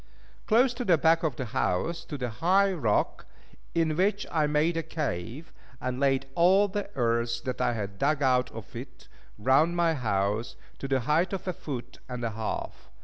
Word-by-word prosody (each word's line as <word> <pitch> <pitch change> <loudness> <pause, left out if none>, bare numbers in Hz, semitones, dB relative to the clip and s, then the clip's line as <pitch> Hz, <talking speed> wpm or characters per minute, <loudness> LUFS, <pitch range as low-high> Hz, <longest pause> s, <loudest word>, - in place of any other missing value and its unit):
Close 245 +3 +4
to 245 +1 -4
the 180 -7 +4
back 165 +2 +4
of 155 -6 -1
the 130 - -4
house 130 - -1
stood 145 -4 -7
a 120 - -2
high 190 - +3
rock, 115 - 0 0.5
in 160 -2 +2
which 200 +4 +1
I 155 -2 +2
made 150 +3 +2
a 165 - 0
cave, 140 - -4 0.3
and 125 0 -3
laid 135 -1 +2
all 190 +5 +5
the 205 +1 -4
earth 115 -1 0
that 130 -1 -3
I - - +2
had 100 -3 -5
dug 145 0 +1
out 125 -1 +3
of 110 -5 -10
it - - -9 0.3
round 135 +10 +3
my 170 -1 +3
house, 105 -3 -1 0.2
to 135 - -4
the 135 -1 +1
height 155 +9 +1
of 190 -1 -4
a 185 - 0
foot 135 -7 -7
and 125 -1 -5
a 115 - -1
half. 110 - -5
140 Hz, 190 wpm, -28 LUFS, 120-170 Hz, 0.5 s, all